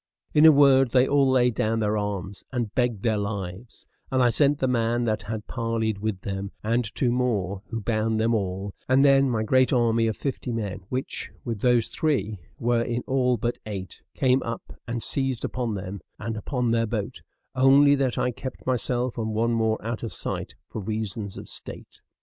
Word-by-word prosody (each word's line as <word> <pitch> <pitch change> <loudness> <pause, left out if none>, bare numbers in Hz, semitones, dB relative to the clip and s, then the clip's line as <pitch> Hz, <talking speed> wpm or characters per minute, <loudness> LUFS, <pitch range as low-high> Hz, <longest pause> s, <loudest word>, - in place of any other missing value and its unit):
In 150 +1 +7
a - - +10
word, 135 -3 +5
they 125 +2 +4
all 140 -1 +3
laid 125 -2 +3
down 110 +1 0
their 105 -1 +1
arms 100 -2 -3
and 120 -4 -2
begged 120 -5 0
their 110 -3 +1
lives; 100 +1 -5 0.3
and 130 - +2
I 120 - +4
sent 145 +3 +3
the 130 - 0
man 120 -1 +1
that 110 -2 0
had 110 +1 -5
parleyed 115 -3 -2
with 105 -3 -3
them, 95 0 -4
and 115 +3 +1
two 125 -3 +1
more, 105 -7 0
who 115 -1 -4
bound 110 +1 0
them 115 +1 +2
all; 95 -1 -2 0.2
and 135 +2 +5
then 135 -1 +5
my 110 -3 0
great 130 +3 +3
army 115 -3 +3
of 110 - -2
fifty 135 -3 -3
men, 105 -5 -3
which, 130 +1 -4 0.2
with 115 -4 -3
those 120 -2 +3
three, 110 - -1 0.2
were 120 0 +1
in 120 +1 -2
all 125 -2 +2
but 120 +3 -2
eight, 95 -4 -6
came 130 0 +3
up 115 0 -6
and 115 -1 -3
seized 135 -3 -1
upon 120 -4 -2
them, 95 0 -6 0.2
and 115 +1 -4
upon 120 +2 -1
their 115 0 +2
boat; 110 +2 -4 0.3
only 135 +2 +6
that 135 -3 0
I 125 - +1
kept 130 +2 -8
myself 125 -1 -1
and 110 -1 -2
one 115 +2 +1
more 110 -1 +1
out 115 0 -3
of 115 - -5
sight - - -4
for 110 - -6
reasons 105 0 -4
of - - -8
state. - - -9
115 Hz, 195 wpm, -25 LUFS, 110-125 Hz, 0.3 s, a